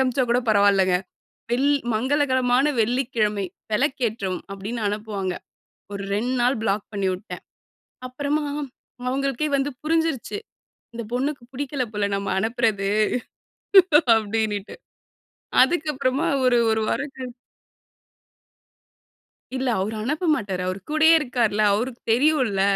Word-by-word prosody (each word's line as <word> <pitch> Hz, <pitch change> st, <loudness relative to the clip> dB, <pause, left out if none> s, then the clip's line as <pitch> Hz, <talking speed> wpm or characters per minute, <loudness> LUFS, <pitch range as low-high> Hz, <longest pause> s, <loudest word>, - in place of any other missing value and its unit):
அனுப்பிச்சா 255 Hz, 0 st, +2 dB
கூட 245 Hz, +1 st, +3 dB
பரவால்லங்க. 200 Hz, -3 st, +4 dB, 0.6 s
வெள் 265 Hz, +4 st, +2 dB, 0.2 s
"மங்களகரமான 260 Hz, +1 st, +2 dB
வெள்ளிக்கிழமை. 225 Hz, -4 st, 0 dB, 0.3 s
வெளக்கேற்றவும்." 220 Hz, -6 st, -1 dB
அப்படின்னு 205 Hz, +4 st, -5 dB
அனுப்புவாங்க. 205 Hz, -3 st, -3 dB, 0.6 s
ஒரு 200 Hz, -, -4 dB
2 235 Hz, +5 st, -1 dB
நாள் 245 Hz, +1 st, +2 dB
பிளாக் 200 Hz, -1 st, 0 dB
பண்ணிவுட்டேன். 190 Hz, 0 st, -3 dB, 0.6 s
அப்பறமா, 285 Hz, +4 st, -2 dB, 0.6 s
அவுங்களுக்கே 275 Hz, +2 st, -1 dB
வந்து 275 Hz, +1 st, 0 dB
புரிஞ்சிருச்சு! 320 Hz, -, 0 dB, 0.6 s
இந்த 235 Hz, 0 st, -5 dB
பொண்ணுக்கு 270 Hz, +1 st, -2 dB
புடிக்கல 275 Hz, 0 st, -2 dB
போல 205 Hz, -1 st, 0 dB
நம்ம 200 Hz, 0 st, -3 dB
அனுப்புறது, 220 Hz, -3 st, 0 dB, 1.3 s
அப்படின்னுட்டு. 215 Hz, -2 st, -2 dB, 0.9 s
அதுக்கப்புறமா 280 Hz, -3 st, 0 dB, 0.2 s
ஒரு 245 Hz, -1 st, +4 dB
1 220 Hz, 0 st, +1 dB
வாரம் 280 Hz, -1 st, -2 dB
கழி 255 Hz, -2 st, -6 dB, 2.2 s
இல்ல. 260 Hz, 0 st, -2 dB
அவரு 210 Hz, +4 st, -2 dB
அனுப்ப 300 Hz, +9 st, -1 dB
மாட்டாரு, 190 Hz, -6 st, -3 dB
அவரு 185 Hz, +1 st, -3 dB
கூடயே 310 Hz, +1 st, +5 dB
இருக்காருல்ல! 235 Hz, -7 st, 0 dB
அவருக்கு 240 Hz, +3 st, -3 dB
தெரியும்ல! 250 Hz, -6 st, +2 dB
240 Hz, 105 wpm, -23 LUFS, 210-270 Hz, 2.2 s, கூடயே